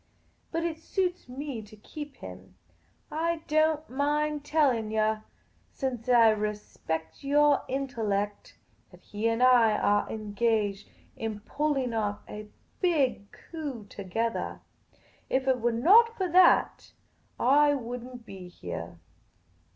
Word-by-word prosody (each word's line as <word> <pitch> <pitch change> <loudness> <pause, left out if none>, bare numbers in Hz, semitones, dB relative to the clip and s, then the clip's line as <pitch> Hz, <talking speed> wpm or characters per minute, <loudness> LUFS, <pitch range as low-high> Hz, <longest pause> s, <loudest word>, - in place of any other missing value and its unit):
But 330 0 -1
it 330 -2 -3
suits 360 -3 -2
me 265 -2 -5
to 215 0 -14
keep 290 +6 -9
him. - - -11 0.6
I 330 +1 -1
don't 310 0 +2
mind 295 +2 -1
telling 270 -9 +2
yah, 215 0 +1 0.5
since 255 -3 -4
I 230 -2 +7
re 210 0 -1
spect 160 - -6
your 290 0 +4
intellect, 220 -7 -3 0.3
that - - -18
he 210 +2 -2
and 230 +2 +1
I 235 -4 +5
are 205 0 +1
engaged 210 -1 -1 0.3
in 220 -2 -5
pulling 275 0 -1
off 210 -2 -1
a 210 0 -8 0.3
big 280 - +1
coup 285 -10 -7
togethah. 225 +4 -3 0.7
If 265 0 0
it 255 -2 +2
were 240 +1 +2
not 430 - +5
for 375 - 0
that, 360 +1 +4 0.5
I 290 +3 +4
would 245 -2 -5
n't 245 -2 -11
be 190 -3 -10
heah. 85 - -7
245 Hz, 130 wpm, -28 LUFS, 215-295 Hz, 0.7 s, I